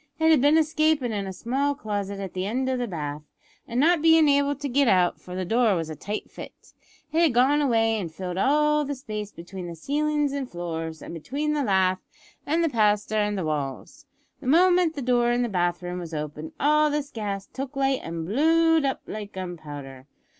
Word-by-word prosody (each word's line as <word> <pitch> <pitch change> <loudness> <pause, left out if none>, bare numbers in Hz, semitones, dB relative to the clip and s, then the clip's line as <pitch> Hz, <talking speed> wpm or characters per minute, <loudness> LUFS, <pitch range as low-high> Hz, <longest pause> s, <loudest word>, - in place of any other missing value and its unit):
It 320 0 +4
had 305 -5 +5
been 290 +3 +5
escapin' 310 -4 +2
in 200 -2 -3
a - - -4
small 270 +9 -1
closet 205 -5 -4
at 195 -2 -6
the 185 +1 -2
end 255 +5 -1
o' 260 - +1
the 245 -1 -2
bath, 150 -5 -5 0.5
and 240 +1 -2
not 330 +3 +4
bein' 320 -1 +6
able 285 0 +3
to 285 +1 -5
git 275 +1 +2
out, 180 -4 +3
for 180 - -9
the 185 0 -2
door 225 +1 +3
was 165 -2 -3
a - - -6
tight 205 +7 -5
fit, - - -12 0.4
it 320 +2 +2
had 315 -8 +3
gone 275 +4 +4
away 225 -5 +2
an' 175 -5 -4
filled 180 +3 -5
all 300 +5 +3
the 285 0 -3
space 215 -6 -6
between 175 +1 -8
the 170 - -7
ceilin's 295 - 0
an' 280 -2 -3
floors, 165 - -5
an' - - -8
between 285 - -2
the 295 - 0
lath, 190 -5 +2 0.5
and 330 +3 +2
plaster, 210 -1 +2
and 210 -1 0
the 185 - -2
walls. 145 -4 -4 0.3
The - - -8
moment 350 +2 +4
the 280 - -4
door 240 -1 +2
in 245 0 +1
the 240 - -1
bath 175 -2 -1
room 180 0 -4
was 165 -2 -6
opened 150 +1 -6
all 300 +1 +4
this 290 -1 -2
gas 200 -3 -4
took 270 +1 -7
light 270 -1 +1
an' 165 0 -5
blowed 320 - +3
up 270 - -1
like 210 -1 -7
gunpowder. 145 -7 -8
230 Hz, 210 wpm, -25 LUFS, 180-290 Hz, 0.5 s, bein